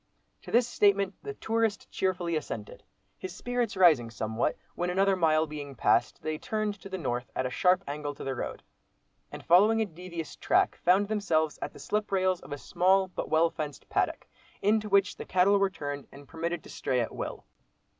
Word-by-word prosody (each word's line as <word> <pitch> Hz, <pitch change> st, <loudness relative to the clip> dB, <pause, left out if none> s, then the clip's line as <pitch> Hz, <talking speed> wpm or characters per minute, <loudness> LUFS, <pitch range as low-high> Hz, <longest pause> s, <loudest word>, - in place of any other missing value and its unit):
To -, -, -12 dB
this 240 Hz, +1 st, +4 dB
statement 200 Hz, -4 st, +2 dB
the 420 Hz, 0 st, -6 dB
tourist 225 Hz, -2 st, -1 dB
cheerfully 180 Hz, -3 st, -1 dB
assented, 115 Hz, -8 st, -5 dB, 0.4 s
his 185 Hz, -1 st, -6 dB
spirits 245 Hz, -3 st, -2 dB
rising 155 Hz, -11 st, +5 dB
somewhat, 110 Hz, 0 st, -2 dB, 0.2 s
when 175 Hz, 0 st, -2 dB
another 195 Hz, +2 st, +3 dB
mile 160 Hz, -3 st, +3 dB
being 145 Hz, -2 st, -7 dB
passed, 120 Hz, 0 st, +2 dB
they 155 Hz, 0 st, -2 dB
turned 215 Hz, +1 st, -2 dB
to 195 Hz, -, -9 dB
the 190 Hz, -, -3 dB
north 125 Hz, -6 st, -3 dB
at 130 Hz, -, -1 dB
a 125 Hz, -, -2 dB
sharp 180 Hz, +8 st, +3 dB
angle 145 Hz, 0 st, -4 dB
to -, -, -8 dB
the 135 Hz, -, -2 dB
road, 120 Hz, -, -5 dB, 0.7 s
and -, -, -9 dB
following 210 Hz, +6 st, +5 dB
a 220 Hz, -, +2 dB
devious 170 Hz, -3 st, -7 dB
track, -, -, +2 dB
found 190 Hz, +4 st, +4 dB
themselves 165 Hz, -8 st, 0 dB
at -, -, -3 dB
the -, -, -14 dB
slip 210 Hz, 0 st, -2 dB
rails 185 Hz, -2 st, +2 dB
of -, -, -13 dB
a 145 Hz, -, -3 dB
small 190 Hz, +5 st, +2 dB
but -, -, -5 dB
well 165 Hz, +1 st, +3 dB
fenced 150 Hz, -2 st, -6 dB
paddock, -, -, 0 dB, 0.3 s
into 210 Hz, +1 st, +1 dB
which 200 Hz, 0 st, +3 dB
the -, -, -5 dB
cattle 190 Hz, +2 st, +4 dB
were 195 Hz, 0 st, +3 dB
turned, 145 Hz, -5 st, -6 dB
and 140 Hz, 0 st, -13 dB
permitted 165 Hz, +2 st, -3 dB
to -, -, -13 dB
stray 125 Hz, -, -1 dB
at 115 Hz, -, -2 dB
will. -, -, -5 dB
180 Hz, 195 wpm, -29 LUFS, 150-200 Hz, 0.7 s, rising